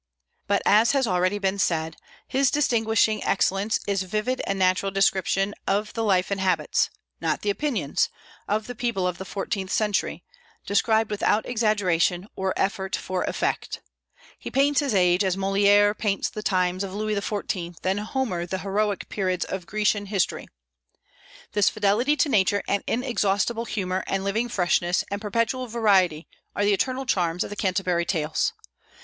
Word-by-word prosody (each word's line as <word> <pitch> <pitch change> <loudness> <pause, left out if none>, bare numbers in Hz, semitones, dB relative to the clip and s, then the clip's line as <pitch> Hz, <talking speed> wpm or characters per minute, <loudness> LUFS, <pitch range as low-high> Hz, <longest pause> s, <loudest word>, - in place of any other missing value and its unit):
But, 200 -1 +1
as 220 +4 +5
has 275 -2 +2
been 195 - -1
already 190 +2 +1
said, 160 -3 0 0.3
his 270 0 +2
distinguishing 225 -6 +2
excellence 195 +2 +1
is 200 -1 0
vivid 215 +7 -2
and 195 - -1
natural 185 +1 +2
description 195 0 +1
of 205 +2 0
the 225 - -2
life 190 -3 +2
and 195 -1 -1
habits, 190 -1 +1 0.3
not - - -1
the 205 - +1
opinions, 210 - 0 0.4
of 215 +1 0
the 245 - -6
people 230 -5 -1
of 180 -1 -3
the 190 - -6
fourteenth 195 0 -3
century, 210 0 0 0.4
described 220 +2 +2
without 210 +1 +1
exaggeration 200 -6 +1
or 190 0 -1
effort 190 -1 -1
for 185 -1 -3
effect. - - -2 0.6
He - - -6
paints 280 0 +3
his 275 -7 0
age 180 0 +4
as 190 -2 +1
Molière 200 +1 +3
paints 205 -2 -1
the 215 - -6
times 185 -2 0
of 195 0 -6
Louis 215 +1 -1
XIV., 195 -4 -3
and 190 +2 0
Homer 210 -6 -2
the 190 - -2
heroic 205 0 -1
periods 185 -3 -1
of 185 -2 -5
Grecian 210 -1 0
history. 195 -3 -1 1.0
This 205 -1 +3
fidelity 215 +7 +2
to 315 - +3
nature 205 -5 +2
and 200 - 0
inexhaustible 230 -2 0
humor 185 -4 -2
and 195 0 -1
living 220 +5 -1
freshness 180 -3 +1
and 200 0 -3
perpetual 230 +4 -1
variety 195 -8 +2 0.3
are 205 - +1
the 205 - +4
eternal 260 +6 -1
charms 180 -6 0
of - - -8
the - - -5
"Canterbury 185 -3 0
Tales." 155 -4 0
200 Hz, 160 wpm, -25 LUFS, 185-215 Hz, 1.0 s, as